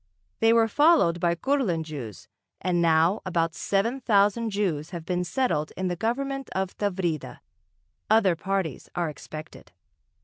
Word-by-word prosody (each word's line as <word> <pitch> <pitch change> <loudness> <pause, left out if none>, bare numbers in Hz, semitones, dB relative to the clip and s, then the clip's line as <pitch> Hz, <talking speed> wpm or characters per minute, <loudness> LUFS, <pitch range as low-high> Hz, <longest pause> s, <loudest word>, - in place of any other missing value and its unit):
They 225 0 +4
were 230 -1 +4
followed 290 - +4
by 170 0 +1
Kurland 215 - 0
Jews, 135 - -8 0.3
and 175 -2 0
now 165 +4 +3
about 165 -3 0
seven 230 +10 -1
thousand 210 0 +2
Jews 180 -7 -1
have 170 -3 -7
been 180 0 -1
settled 180 - -1
in 185 -1 -1
the 175 - -1
government 275 +7 -2
of 190 -1 -2
Tavrida. 180 -7 -2 0.7
Other 210 -5 +4
parties 190 -4 -3
are 175 -2 0
expected.... 155 - -11
185 Hz, 140 wpm, -26 LUFS, 165-225 Hz, 0.7 s, They